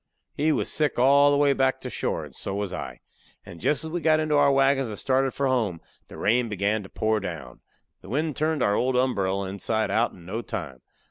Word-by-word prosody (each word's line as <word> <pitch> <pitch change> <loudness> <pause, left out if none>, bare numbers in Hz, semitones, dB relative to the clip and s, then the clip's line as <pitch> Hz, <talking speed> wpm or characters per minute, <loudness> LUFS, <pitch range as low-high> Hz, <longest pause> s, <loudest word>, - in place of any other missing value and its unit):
He 155 +2 +1
was - - -1
sick 150 -3 0
all 140 +3 +5
the 145 - +3
way 145 -1 +4
back 135 -1 +1
to - - -13
the - - -3
shore, - - -2
and - - -15
so 95 - -4
was 100 -2 -3
I. - - -6 0.4
And 85 - -11
jest 150 - +1
as 160 - -6
we 175 +1 -2
got 155 0 +3
into 155 -1 0
our 145 -1 +5
wagons 135 -1 +3
and 105 -2 -6
started 135 +2 +1
for 140 - -2
home, 115 -10 0 0.3
the - - -11
rain 120 +2 +1
began 105 +1 0
to 95 - -11
pour 110 0 0
down. 80 -10 -7 0.4
The - - -13
wind 150 +2 -1
turned 155 0 0
our 100 - +2
old 125 +4 +1
umberell 100 -7 0
inside 110 +3 -2
out 115 +2 +1
in 85 -2 -15
no 110 +6 -4
time. 80 - -6
125 Hz, 230 wpm, -25 LUFS, 100-140 Hz, 0.4 s, all